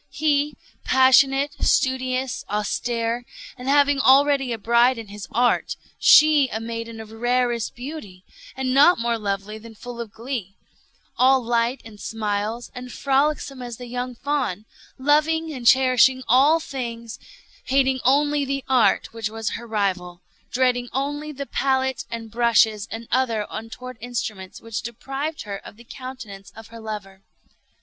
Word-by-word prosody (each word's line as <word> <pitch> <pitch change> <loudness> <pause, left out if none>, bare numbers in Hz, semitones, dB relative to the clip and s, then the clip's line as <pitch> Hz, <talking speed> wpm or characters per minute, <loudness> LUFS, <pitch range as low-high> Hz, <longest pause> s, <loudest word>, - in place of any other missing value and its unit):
He, 290 -2 0 0.3
passionate, 270 +2 +4
studious, 260 -1 0
austere, 230 +4 -1 0.3
and 255 0 -6
having 285 0 +4
already 275 -1 +4
a 230 - -2
bride 235 +3 +3
in 225 -3 -8
his 205 0 -8
Art; 245 +1 +1 0.2
she 300 -3 +6
a 220 - -3
maiden 230 0 -6
of 220 -1 -10
rarest 240 0 0
beauty, 245 -9 -8 0.3
and 260 -1 -1
not 290 +7 +6
more 235 0 -1
lovely 200 +1 -3
than 225 0 -13
full 240 +2 -8
of 225 -3 -8
glee; 225 -4 -6 0.6
all 260 +1 +5
light 235 +2 0
and 215 -2 -12
smiles, 215 +2 -3
and 250 0 -8
frolicsome 275 0 0
as 240 -2 -7
the 245 - -8
young 245 +1 -4
fawn; 260 -7 -2 0.3
loving 310 +3 +2
and 250 -4 -4
cherishing 260 0 +5
all 280 +7 +5
things; 235 -6 -6 0.5
hating 265 0 +2
only 290 +3 +3
the 275 0 -3
Art 255 -3 +2
which 225 -2 -3
was 225 0 -4
her 235 +1 -6
rival; 185 -5 -2 0.3
dreading 245 -1 +1
only 290 +3 -3
the 280 -1 -6
pallet 265 -2 0
and 230 -1 -7
brushes 225 -2 +3
and 225 +1 -7
other 230 -4 +1
untoward 225 +2 -8
instruments 220 -6 -5
which 225 -4 -5
deprived 270 +7 -5
her 200 -2 -5
of - - -13
the 235 - -15
countenance 240 -7 -9
of 225 0 -12
her 230 0 -11
lover. 205 -3 -7
245 Hz, 145 wpm, -23 LUFS, 225-270 Hz, 0.6 s, she